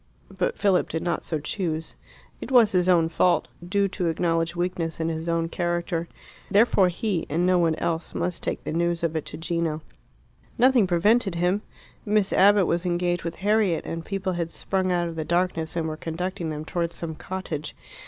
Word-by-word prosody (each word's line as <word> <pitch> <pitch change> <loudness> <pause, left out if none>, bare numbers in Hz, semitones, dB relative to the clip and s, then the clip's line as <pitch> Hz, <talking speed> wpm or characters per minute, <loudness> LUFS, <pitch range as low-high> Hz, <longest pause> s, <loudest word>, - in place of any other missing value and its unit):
But 485 - -1
Philip 195 -3 +2
did 160 - -3
not 175 - -1
so 155 - -2
choose. 160 +1 -3 0.5
It - - -6
was 240 -5 +6
his 180 -1 +2
own 170 -3 +4
fault, 175 +2 +2
due 200 +3 +1
to 180 -2 -2
acknowledged 165 0 0
weakness 175 -2 -2
in 165 0 0
his 160 +1 -3
own 165 0 +1
character. 175 0 -2 0.4
Therefore 200 -2 +4
he, 180 -1 -2
and 170 +4 +1
no 180 0 +4
one 165 -2 +2
else, 165 0 -3
must 180 -1 -2
take - - -2
the - - -4
news 170 0 0
of 165 -1 0
it 160 - -2
to - - -7
Gino. 165 -2 -2 0.7
Nothing 245 -4 +5
prevented 195 +3 +2
him. 180 +4 +1 0.4
Miss 210 -2 +1
Abbott 200 0 +5
was 170 +1 0
engaged 175 -1 0
with 170 - -4
Harriet, 210 -5 +2
and 165 0 -4
people 190 0 -2
had 170 -1 -2
sprung 185 +2 -1
out 175 -1 +1
of 165 - -6
the 160 - -2
darkness 170 -1 0
and 165 -2 -1
were 155 0 -4
conducting 175 +2 -4
them 155 0 -5
towards 170 0 -2
some 165 -1 -4
cottage. 160 -3 -5
175 Hz, 190 wpm, -25 LUFS, 165-185 Hz, 0.7 s, was